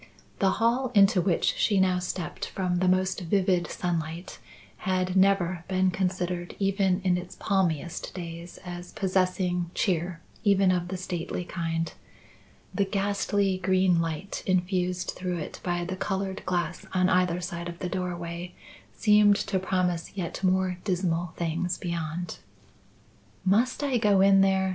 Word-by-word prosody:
The 195 Hz, -, +4 dB
hall 240 Hz, +3 st, +2 dB
into 195 Hz, -2 st, +6 dB
which 175 Hz, -1 st, +2 dB
she 205 Hz, -3 st, +3 dB
now 185 Hz, -1 st, +3 dB
stepped 180 Hz, -1 st, -4 dB
from 180 Hz, -2 st, -1 dB
the 185 Hz, -, +2 dB
most 185 Hz, 0 st, +2 dB
vivid 180 Hz, 0 st, +1 dB
sunlight 170 Hz, 0 st, -3 dB, 0.4 s
had 185 Hz, 0 st, -1 dB
never 190 Hz, -3 st, +3 dB
been 185 Hz, 0 st, +2 dB
considered 180 Hz, -1 st, -2 dB
even 195 Hz, -1 st, +1 dB
in 180 Hz, -1 st, +2 dB
its 180 Hz, 0 st, -9 dB
palmiest 175 Hz, -5 st, -1 dB
days 170 Hz, -1 st, -7 dB
as 175 Hz, 0 st, -7 dB
possessing 185 Hz, -2 st, 0 dB
cheer 175 Hz, -2 st, 0 dB, 0.2 s
even 195 Hz, -3 st, +4 dB
of 175 Hz, -1 st, 0 dB
the 185 Hz, +1 st, -4 dB
stately 180 Hz, -1 st, -4 dB
kind. 165 Hz, -2 st, -2 dB, 0.8 s
The 200 Hz, -, +2 dB
ghastly 200 Hz, -1 st, 0 dB
green 185 Hz, -2 st, +3 dB
light 165 Hz, +4 st, -4 dB
infused 180 Hz, -1 st, 0 dB
through 180 Hz, -1 st, -3 dB
it 155 Hz, -, -6 dB
by 175 Hz, -1 st, -1 dB
the 185 Hz, +1 st, -3 dB
coloured 195 Hz, 0 st, -2 dB
glass 175 Hz, -1 st, -1 dB
on 185 Hz, 0 st, +4 dB
either 180 Hz, -1 st, +2 dB
side 175 Hz, -1 st, -5 dB
of 170 Hz, -, -8 dB
the 180 Hz, -, -3 dB
doorway 175 Hz, -1 st, -4 dB, 0.4 s
seemed 210 Hz, -1 st, +5 dB
to 195 Hz, -1 st, -1 dB
promise 180 Hz, -1 st, -1 dB
yet 175 Hz, 0 st, -4 dB
more 185 Hz, -1 st, +1 dB
dismal 175 Hz, -3 st, -1 dB
things 170 Hz, +2 st, -1 dB
beyond. 170 Hz, 0 st, -4 dB, 1.1 s
"Must 230 Hz, +9 st, +2 dB
I 265 Hz, -4 st, +1 dB
go 205 Hz, -3 st, +4 dB
in 195 Hz, 0 st, +6 dB
there?" 190 Hz, -1 st, +3 dB
185 Hz, 145 wpm, -27 LUFS, 175-190 Hz, 1.1 s, into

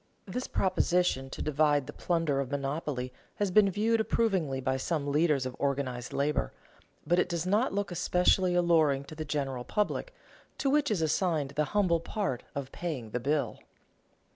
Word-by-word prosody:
This 250 Hz, +7 st, -4 dB
proposition 180 Hz, -7 st, +1 dB
to -, -, -5 dB
divide 150 Hz, -1 st, +2 dB
the -, -, -8 dB
plunder 165 Hz, -5 st, 0 dB
of 135 Hz, -2 st, -2 dB
monopoly 140 Hz, -2 st, -3 dB, 0.2 s
has 205 Hz, -2 st, -1 dB
been 200 Hz, +1 st, +6 dB
viewed 220 Hz, +4 st, +1 dB
approvingly 190 Hz, -12 st, +1 dB
by 130 Hz, 0 st, 0 dB
some 145 Hz, 0 st, -1 dB
leaders 150 Hz, -3 st, +2 dB
of 130 Hz, -1 st, -4 dB
organized 135 Hz, -3 st, -2 dB
labor, 140 Hz, -, 0 dB, 0.5 s
but 175 Hz, +4 st, +3 dB
it -, -, +1 dB
does 170 Hz, -1 st, -2 dB
not 210 Hz, +7 st, +2 dB
look 200 Hz, -1 st, -2 dB
especially 180 Hz, +1 st, +2 dB
alluring 160 Hz, -6 st, +3 dB
to 140 Hz, -, -11 dB
the 155 Hz, 0 st, -5 dB
general 135 Hz, -4 st, -2 dB
public, 210 Hz, -, -1 dB, 0.5 s
to 275 Hz, -, +1 dB
which 295 Hz, 0 st, +3 dB
is 195 Hz, -7 st, +1 dB
assigned 160 Hz, -3 st, 0 dB
the 150 Hz, +1 st, 0 dB
humble 175 Hz, -5 st, +3 dB
part 170 Hz, -, -2 dB
of 140 Hz, -2 st, -4 dB
paying 140 Hz, -11 st, -5 dB
the 125 Hz, -, -1 dB
bill. 145 Hz, +4 st, -1 dB
155 Hz, 165 wpm, -30 LUFS, 140-185 Hz, 0.5 s, been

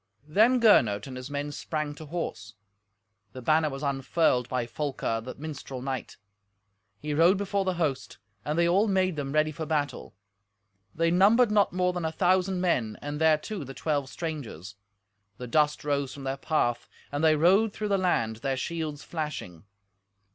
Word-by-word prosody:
Then 220 Hz, +10 st, +4 dB
Gernot 110 Hz, -, +4 dB
and 130 Hz, -, -8 dB
his 130 Hz, +2 st, -7 dB
men 145 Hz, +1 st, -3 dB
sprang 150 Hz, 0 st, -3 dB
to 155 Hz, +1 st, -11 dB
horse. 170 Hz, +2 st, -5 dB, 0.8 s
The 130 Hz, -, -8 dB
banner 155 Hz, +3 st, +3 dB
was 135 Hz, +1 st, -7 dB
unfurled 135 Hz, -2 st, +1 dB
by 125 Hz, -2 st, -1 dB
Folker, 120 Hz, -3 st, -3 dB
the 130 Hz, -, -7 dB
minstrel 140 Hz, -3 st, -7 dB
knight. 130 Hz, -2 st, -4 dB, 0.8 s
He 150 Hz, +4 st, -4 dB
rode 170 Hz, +6 st, +5 dB
before 200 Hz, 0 st, -1 dB
the 185 Hz, -1 st, 0 dB
host, 155 Hz, -6 st, -2 dB, 0.3 s
and 150 Hz, +5 st, -2 dB
they 170 Hz, 0 st, +4 dB
all 195 Hz, +5 st, +3 dB
made 185 Hz, -3 st, +1 dB
them 140 Hz, -2 st, -4 dB
ready 155 Hz, +1 st, +2 dB
for 160 Hz, 0 st, -6 dB
battle. 145 Hz, -8 st, -2 dB, 0.8 s
They 165 Hz, +1 st, +2 dB
numbered 210 Hz, +6 st, +5 dB
not 205 Hz, -1 st, +3 dB
more 180 Hz, 0 st, +1 dB
than 175 Hz, -1 st, -3 dB
a 160 Hz, -, -1 dB
thousand 185 Hz, +2 st, +1 dB
men, 120 Hz, -12 st, 0 dB
and 145 Hz, +1 st, -5 dB
thereto 160 Hz, +4 st, +1 dB
the 135 Hz, 0 st, -9 dB
twelve 145 Hz, -4 st, -1 dB
strangers. 140 Hz, -, -6 dB, 0.6 s
The 125 Hz, -, -6 dB
dust 150 Hz, +4 st, +1 dB
rose 140 Hz, -2 st, -1 dB
from 140 Hz, -, -9 dB
their 135 Hz, 0 st, -2 dB
path, 120 Hz, -5 st, -1 dB, 0.2 s
and 145 Hz, +2 st, -2 dB
they 155 Hz, -1 st, +5 dB
rode 190 Hz, +8 st, +4 dB
through 210 Hz, 0 st, -4 dB
the 200 Hz, -1 st, +2 dB
land, 115 Hz, -12 st, 0 dB
their 135 Hz, +3 st, -2 dB
shields 155 Hz, -1 st, -4 dB
flashing. 150 Hz, -, -5 dB
155 Hz, 170 wpm, -27 LUFS, 135-175 Hz, 0.8 s, rode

